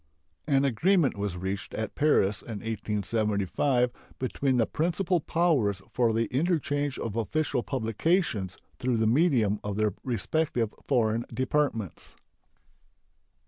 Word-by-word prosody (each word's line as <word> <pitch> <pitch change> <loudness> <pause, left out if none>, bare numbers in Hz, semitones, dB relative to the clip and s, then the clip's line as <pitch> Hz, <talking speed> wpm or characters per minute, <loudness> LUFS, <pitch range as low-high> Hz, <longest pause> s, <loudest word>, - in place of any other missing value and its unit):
An 140 -2 +3
agreement 155 - +3
was 100 -3 -3
reached 95 +2 -4
at 110 - -3
Paris 110 -10 +2
in 110 -4 -7
1875 110 +3 0 0.3
between 130 0 0
the 115 - +4
principal 175 - 0
powers 145 - +1
for 120 -2 +2
the 115 +1 +1
interchange 145 -3 0
of 110 -2 -4
official 125 +4 0
publications 115 - 0 0.2
through 125 -2 +1
the 110 - +2
medium 115 - +3
of 105 -1 -3
their 105 -1 +1
respective 125 -2 -1
foreign 115 -3 +2
departments. 130 - -1
120 Hz, 115 wpm, -28 LUFS, 105-145 Hz, 0.3 s, the